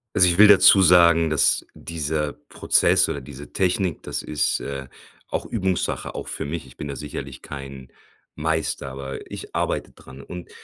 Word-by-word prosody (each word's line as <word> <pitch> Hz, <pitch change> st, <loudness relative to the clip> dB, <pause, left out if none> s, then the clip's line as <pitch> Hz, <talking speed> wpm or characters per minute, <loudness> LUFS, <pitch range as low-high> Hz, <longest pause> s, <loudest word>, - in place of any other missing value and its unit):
Also 90 Hz, -, +6 dB
ich, 85 Hz, 0 st, +1 dB
will 105 Hz, 0 st, +8 dB
dazu 100 Hz, 0 st, +7 dB
sagen, 85 Hz, -2 st, +5 dB
dass 75 Hz, -1 st, +2 dB
dieser 75 Hz, -2 st, -3 dB
Prozess -, -, +2 dB
oder 70 Hz, -, -4 dB
diese 70 Hz, +2 st, -11 dB
Technik 90 Hz, -2 st, 0 dB
das -, -, -4 dB
ist, 75 Hz, -, 0 dB
äh, 70 Hz, -1 st, -6 dB, 0.4 s
auch -, -, -3 dB
Übungssache 95 Hz, -5 st, -2 dB
auch -, -, -6 dB
für -, -, -5 dB
mich. 75 Hz, -1 st, -5 dB
Ich 60 Hz, -, -16 dB
bin 75 Hz, -, -7 dB
da 70 Hz, -, -5 dB
sicherlich 70 Hz, -3 st, -7 dB
kein 70 Hz, -2 st, -9 dB, 0.5 s
Meister, 80 Hz, -2 st, -2 dB
aber 65 Hz, 0 st, -8 dB
ich -, -, -8 dB
arbeite -, -, -2 dB
dran 65 Hz, +1 st, -13 dB
und 90 Hz, +4 st, -9 dB
75 Hz, 170 wpm, -23 LUFS, 70-85 Hz, 0.5 s, will